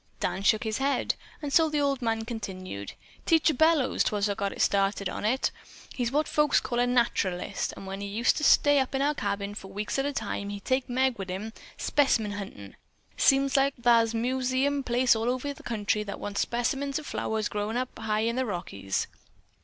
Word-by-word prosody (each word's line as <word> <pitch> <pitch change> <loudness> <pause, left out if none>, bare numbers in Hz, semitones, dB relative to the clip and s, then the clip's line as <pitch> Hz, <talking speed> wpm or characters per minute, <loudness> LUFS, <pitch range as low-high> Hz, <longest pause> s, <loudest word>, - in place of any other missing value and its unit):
Dan 190 - -2
shook 215 +2 +3
his 220 +1 -2
head, 275 +1 +1 0.3
and 285 -1 -3
so 325 -1 +5
the 300 -1 0
old 280 -2 +1
man 225 -1 -1
continued: 185 - -6 0.3
"Teacher 320 -1 +4
Bellows 315 -1 +3
'twas 205 -1 0
got 200 0 -2
her - - -9
started 200 0 +1
on 205 - -4
it. 255 +5 +1 0.4
He's 240 -2 -1
what 300 +3 +1
folks 300 0 +3
call 240 -1 -3
a 245 - +3
naturalist, 200 -6 0
an' - - -9
when 195 +1 -6
he 200 - -4
used 220 +4 +2
to 305 - -3
stay 290 -1 +5
up 265 - 0
to 270 - 0
our 290 +2 +2
cabin 200 -5 -3
for 200 -2 -8
weeks 205 +6 -3
at 275 - +1
a - - -1
time 235 -6 -3
an' - - -5
he'd 200 -1 -7
take 260 0 0
Meg 255 -1 +1
wi' 195 - -3
him 195 +4 -5 0.2
specimen 240 -7 +2
huntin'. 195 - -8 0.4
Seems 275 0 +3
like 275 0 +3
thar's 230 -1 +3
museum 260 +4 0
places 245 -1 +3
all 225 +2 0
over 255 +3 -2
this 280 - -6
here - - -13
country 210 -2 0
that 200 -1 -6
wants 205 -1 -2
specimens 270 +4 -1
of 310 - -6
flowers 220 -5 -2
growin' 210 +2 -3
high 220 -4 -1
up - - +2
in 235 - -3
the 260 - +1
Rockies. 100 - -3
235 Hz, 210 wpm, -28 LUFS, 205-270 Hz, 0.4 s, so